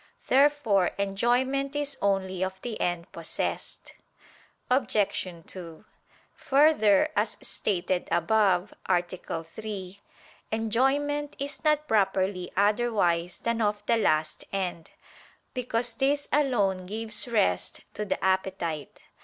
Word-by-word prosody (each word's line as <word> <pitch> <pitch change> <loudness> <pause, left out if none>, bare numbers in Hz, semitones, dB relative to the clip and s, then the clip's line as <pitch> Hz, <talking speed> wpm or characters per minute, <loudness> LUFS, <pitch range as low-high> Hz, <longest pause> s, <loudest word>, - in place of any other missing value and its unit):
Therefore 265 -9 +4
enjoyment 245 +8 +1
is 290 -1 -2
only 190 -2 0
of 190 0 -3
the 235 -3 -4
end 175 0 -1
possessed. - - -4 0.7
Obj. 250 -6 +1 0.2
2: 170 0 -10 0.5
Further, 270 -9 +4
as 210 +1 0
stated 185 -2 -1
above 190 +1 +2
(A. 175 -2 +3 0.4
3), 195 +1 -7 0.5
enjoyment 270 +7 +1
is 280 +1 -5
not 305 -1 +2
properly 190 -3 +1
otherwise 200 -5 +2
than 235 0 0
of 210 -1 0
the 230 - +3
last 155 -7 +1
end: 180 -4 -3 0.6
because 240 -2 -2
this 280 +4 +1
alone 205 -11 +2
gives 215 +3 -2
rest 90 - 0
to 210 - -3
the 205 - -2
appetite. 190 -5 -1
210 Hz, 105 wpm, -27 LUFS, 185-250 Hz, 0.7 s, Therefore